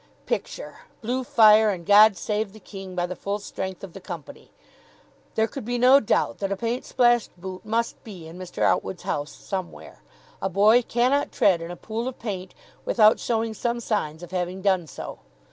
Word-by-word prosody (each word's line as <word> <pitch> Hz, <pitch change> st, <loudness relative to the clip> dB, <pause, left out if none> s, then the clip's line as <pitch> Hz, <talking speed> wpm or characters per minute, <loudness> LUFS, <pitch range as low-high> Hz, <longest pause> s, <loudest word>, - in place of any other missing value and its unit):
Picture, -, -, -4 dB, 0.3 s
Blue 250 Hz, +3 st, -1 dB
Fire 220 Hz, -2 st, +6 dB
and 180 Hz, -4 st, -3 dB
"God 205 Hz, 0 st, +7 dB
Save 210 Hz, -1 st, -2 dB
the 215 Hz, -, -13 dB
King" 195 Hz, -2 st, -9 dB
by 175 Hz, -1 st, 0 dB
the 180 Hz, +1 st, -5 dB
full 200 Hz, +2 st, -3 dB
strength 190 Hz, -2 st, -6 dB
of 190 Hz, -4 st, -8 dB
the -, -, -9 dB
company. 175 Hz, -5 st, -9 dB, 0.9 s
There 220 Hz, -, +3 dB
could 255 Hz, +3 st, -7 dB
be 245 Hz, +2 st, -2 dB
no 255 Hz, +3 st, +7 dB
doubt 220 Hz, -, 0 dB
that 195 Hz, -1 st, -2 dB
a -, -, +1 dB
paint 235 Hz, +4 st, -2 dB
splashed 240 Hz, -2 st, +3 dB
boot 185 Hz, 0 st, -7 dB
must 230 Hz, +2 st, -2 dB
be 190 Hz, -7 st, -10 dB
in 165 Hz, -, -11 dB
Mr. 185 Hz, -1 st, -4 dB
Outwood's 185 Hz, -, 0 dB
house 145 Hz, +1 st, -3 dB
somewhere. 185 Hz, -3 st, -7 dB, 0.4 s
A 195 Hz, -, 0 dB
boy 210 Hz, +6 st, +5 dB
cannot 250 Hz, +4 st, +1 dB
tread 180 Hz, -4 st, +3 dB
in 165 Hz, -, -6 dB
a 175 Hz, -, -6 dB
pool 225 Hz, +6 st, -4 dB
of 260 Hz, -, -5 dB
paint 190 Hz, -5 st, -6 dB, 0.3 s
without 215 Hz, -1 st, +4 dB
showing 225 Hz, -1 st, -1 dB
some 235 Hz, +3 st, -2 dB
signs 175 Hz, -8 st, -2 dB
of 175 Hz, -, -10 dB
having 185 Hz, +1 st, -3 dB
done 190 Hz, -4 st, +2 dB
so. -, -, -8 dB
205 Hz, 190 wpm, -25 LUFS, 185-230 Hz, 0.9 s, God